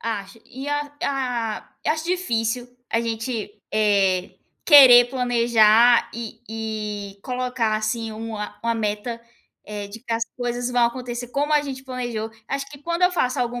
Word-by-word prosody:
Acho 205 -2 -5
e 270 +3 -8
a 290 0 -2
ah, 250 -7 -2 0.2
acho 315 +1 0
difícil 245 -9 -1 0.2
a 230 - +2
gente, 230 -1 -3 0.2
eh, 195 -4 +2 0.3
querer 255 -5 +9
planejar 235 -2 +4
e 230 -1 -7
e 210 -2 -5
colocar, 250 -3 -1
assim, 220 +1 -2
uma 220 -1 -6
uma 230 0 0
meta, 225 +2 -3 0.4
eh, 205 -1 -6
de 210 +3 -9
que 235 -1 -5
as 230 0 0
coisas 245 0 -2
vão 245 -1 +4
acontecer 245 0 -5
como 290 +4 -1
a 295 -1 +4
gente 265 -2 -6
planejou. 240 -4 -4 0.2
Acho 275 0 -3
que 285 - -11
quando 340 +3 -2
eu 360 - +6
faço 255 -7 0
algum 245 0 -2
235 Hz, 155 wpm, -23 LUFS, 220-255 Hz, 0.4 s, querer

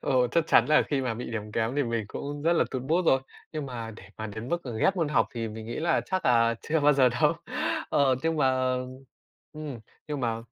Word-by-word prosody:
Ờ, 125 -1 +2
chắc 165 -2 +2
chắn 120 - +5
là 155 0 +5
khi 140 -2 -1
mà 125 -3 -1
bị 120 +1 -6
điểm 105 -2 -5
kém 115 +5 -1
thì 145 - +3
mình 115 -3 -1
cũng 145 +5 -5
rất 165 +2 +3
là - - +3
tụt 130 -2 -3
mood 165 +5 +1
rồi, 135 - +5 0.3
nhưng 155 -2 -4
mà 115 -3 -5
để 110 - -12 0.2
mà 110 - -3
đến 110 +3 -7
mức 170 +3 -1 0.2
ghét 195 - +3
môn 165 -4 +1
học 150 - +3
thì 115 -1 -3
mình 110 0 -8
nghĩ 115 - -5
là 170 +1 +2
chắc 185 0 -2
là 115 -1 +4
chưa 160 0 0
bao 150 +1 +5
giờ 130 -2 +5
đâu. 125 - +2 0.6
Ờ, 135 -2 +4
nhưng 165 0 0
mà 130 -2 +2 0.8
ừm, 150 -5 -6 0.3
nhưng 145 -2 -3
mà 115 -2 0
130 Hz, 240 wpm, -27 LUFS, 115-150 Hz, 0.8 s, chắn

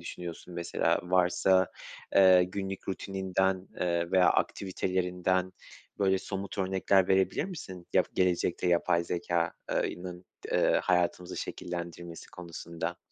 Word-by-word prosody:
düşünüyorsun 85 +1 -8
mesela 85 0 0
varsa, 90 +1 +3 0.4
eee, 95 -2 +7
günlük 95 +1 -5
rutininden, 95 -1 -1
eee, 85 -1 0
veya 90 -1 +5
aktivitelerinden, 95 -1 0 0.5
böyle, 95 -1 +3
somut 95 +1 -6
örnekler 95 0 +2
verebilir 95 +8 +2
misin 95 - -8
ya - - +5
gelecekte 90 -1 +1
yapay 85 0 +2
zekâ 85 -1 -1 0.2
eee, - - 0
ının 90 0 -8 0.3
d - - +3
hayatımızı 90 0 0
şekillendirmesi 85 -1 -6
konusunda? 85 -1 -6
90 Hz, 110 wpm, -30 LUFS, 85-95 Hz, 0.5 s, eee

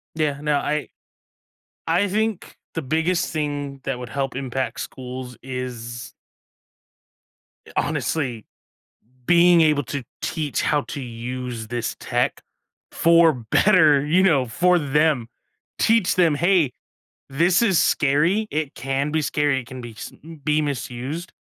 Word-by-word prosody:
Yeah. 150 -3 -1
No. 150 0 +1
I 150 +1 -2 1.0
I 180 +5 +2
think 215 0 -2 0.2
the 165 - -2
biggest 160 +6 0
thing 145 -3 -3
that 135 -2 -2
would 125 -1 -7
help 135 0 -3
impact 130 -1 -3
schools 125 -1 -7
is 125 -2 -6 1.7
honestly, 125 -8 -1 0.8
being 175 0 +6
able 150 -2 +3
to 135 +4 -4 0.2
teach 150 -3 -2
how 150 -1 +1
to 140 - -7
use 120 -1 -6
this 120 0 -3
tech - - -1 0.5
for 165 -1 +5 0.2
better, 155 -9 +5
you 170 +6 +3
know, 145 -9 +3
for 180 +10 +3
them. 150 -4 +1 0.5
Teach 225 -5 +3
them, 170 -4 +4
"Hey, 170 -4 +2 0.6
this 170 +9 +3
is 195 -7 +3
scary. 165 +10 +2
It 155 -2 -2
can 135 +4 -2
be 155 0 +1
scary. 145 -2 +1
It 120 - -16
can 130 +1 -8
be 120 -1 -9
sm 160 +8 -10
be 150 +1 +2
misused, 140 +4 -4
145 Hz, 130 wpm, -22 LUFS, 130-165 Hz, 1.7 s, being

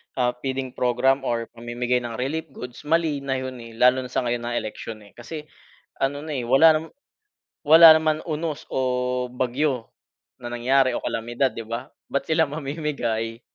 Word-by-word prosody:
ah, 125 -1 +2
feeding 130 -1 -3
program 130 +3 +1
or 115 -1 -2
mamimigay 120 +1 -1
ng 120 -1 -6
relief 155 +7 -3
goods, 125 -1 -9
mali 160 -3 +2
na 135 -1 -2
yun, 130 0 -5
eh, 115 0 -10
lalo 125 +2 +5
na 125 - -8
sa - - 0
ngayon 120 0 -2
na 120 0 -2
eleksyon, 110 0 -5
eh, 100 - -17
kasi 150 +6 -8 0.6
ano 145 +1 -1
na, 155 -2 -4
eh, 125 -2 -2
wala 155 +5 +6
naman 160 +1 -11 0.8
wala 165 +2 +10
naman 155 -1 +2
unos 155 -1 -3
o 125 -1 0
bagyo 125 0 -1 0.5
na 120 - -6
nangyari 130 +1 +2
o - - -3
kalamidad, 120 +4 -1
'di 115 - -7
ba? 115 +1 -5 0.2
Ba't 140 - -1
sila 160 -2 +2
mamimigay? 140 -7 -3
130 Hz, 175 wpm, -24 LUFS, 120-150 Hz, 0.8 s, wala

